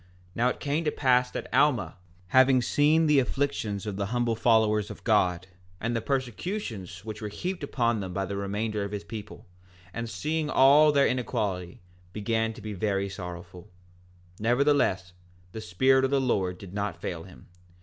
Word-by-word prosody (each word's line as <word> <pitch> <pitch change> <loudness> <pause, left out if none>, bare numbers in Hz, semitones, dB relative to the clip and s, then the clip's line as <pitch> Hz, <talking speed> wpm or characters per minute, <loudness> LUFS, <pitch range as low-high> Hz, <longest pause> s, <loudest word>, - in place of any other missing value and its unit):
4:15 90 - -28
And - - -29 0.3
now 120 +2 +2
it - - -4
came 145 +3 -1
to 150 - 0
pass 125 -3 +2
that - - -7
Alma, 120 - +2 0.3
having 130 +3 +5
seen 150 +6 +3
the 150 -2 +5
afflictions 125 -7 -2
of 105 -2 -4
the 100 -1 -2
humble 120 0 0
followers 110 -2 +2
of - - -10
God, 90 -5 +2 0.3
and 115 +2 -2
the 115 - -1
persecutions 120 - -4
which 110 0 -7
were 105 - -3
heaped 180 - -4
upon 120 -5 0
them 95 -2 -5
by 95 +1 -2
the 100 +1 -5
remainder 105 +2 -2
of 100 +1 -5
his 100 - -4
people, 105 -2 -9 0.5
and 115 0 -4
seeing 155 +4 -2
all 145 +3 +6
their 140 -1 +4
inequality, 100 -8 -2 0.3
began 110 +2 -1
to 110 - -12
be 105 0 -6
very 100 0 -1
sorrowful; 90 -1 -9 0.7
nevertheless 120 -6 +2 0.4
the 110 - -7
Spirit 130 +9 +3
of 135 - +2
the 140 0 +2
Lord 95 -8 0
did 95 -1 -11
not 100 -4 -3
fail 85 -1 -4
him. 95 - -15
110 Hz, 180 wpm, -27 LUFS, 100-130 Hz, 0.7 s, all